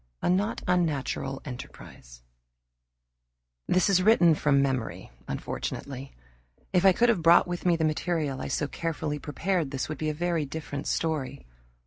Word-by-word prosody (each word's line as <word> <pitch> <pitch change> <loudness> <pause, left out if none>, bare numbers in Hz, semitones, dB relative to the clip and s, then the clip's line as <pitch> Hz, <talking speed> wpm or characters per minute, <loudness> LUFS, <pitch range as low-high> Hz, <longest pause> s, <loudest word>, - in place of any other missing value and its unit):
A - - +3
Not 200 +4 0
Unnatural 150 -6 -1
Enterprise - - -10 1.4
This 185 0 +3
is 195 -2 +4
written 180 -5 +5
from 145 -2 +2
memory, 130 - -2 0.2
unfortunately. 130 - -5 0.6
If 180 +1 +3
I - - +8
could 235 +6 +3
have 215 -7 +2
brought 170 +2 +6
with 175 +1 -3
me 175 - +4
the 160 -1 0
material 155 -3 -1
I - - -4
so 150 - -1
carefully 155 -2 -3
prepared, 160 +3 -1
this 135 -1 -3
would 155 - -5
be 155 - -1
a - - -1
very 170 -1 0
different 145 -1 -6
story. 150 -4 -2
155 Hz, 150 wpm, -27 LUFS, 140-175 Hz, 1.4 s, I